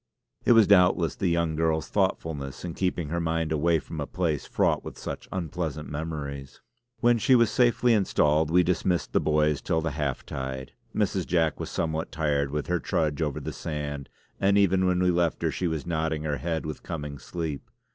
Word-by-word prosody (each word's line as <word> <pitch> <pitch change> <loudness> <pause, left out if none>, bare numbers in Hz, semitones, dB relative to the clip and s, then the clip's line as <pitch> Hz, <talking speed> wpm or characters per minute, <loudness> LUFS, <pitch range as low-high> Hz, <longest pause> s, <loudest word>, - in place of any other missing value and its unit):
It - - +6
was 115 -2 +7
doubtless 90 -5 +4
the 95 - -1
young 85 -2 +1
girl's 80 -1 0
thoughtfulness 70 -2 -2
in 85 - -4
keeping 90 -4 -1
her 85 +2 -1
mind 80 -1 -1
away 80 +2 +3
from 75 - -6
a - - -3
place 80 -6 -1
fraught - - +1
with - - -8
such - - -6
unpleasant 80 -4 -3
memories. 70 -3 -5 0.4
When 120 -1 +4
she 130 +4 +5
was 115 -3 +4
safely 120 0 +3
installed 80 -7 +2
we 90 +2 +5
dismissed 90 0 0
the - - +4
boys 75 -1 +2
till 80 - 0
the 80 0 -2
half 70 -3 -3
tide. 65 0 -5 0.2
Mrs. 95 -3 0
Jack 80 -3 +1
was - - -4
somewhat 80 0 -2
tired 75 -3 0
with 75 +1 -2
her 90 0 0
trudge 75 -2 -1
over 75 -3 -1
the - - -5
sand, 75 -3 -5 0.3
and 100 +1 +3
even 95 -2 +3
when 90 0 +2
we 90 - +4
left 85 -1 0
her - - +2
she 90 - -1
was 80 -3 -3
nodding 80 -2 -1
her 75 -2 -1
head 80 +4 -2
with 75 -1 -5
coming 75 -4 -6
sleep. 80 0 -5
80 Hz, 195 wpm, -27 LUFS, 75-90 Hz, 0.4 s, was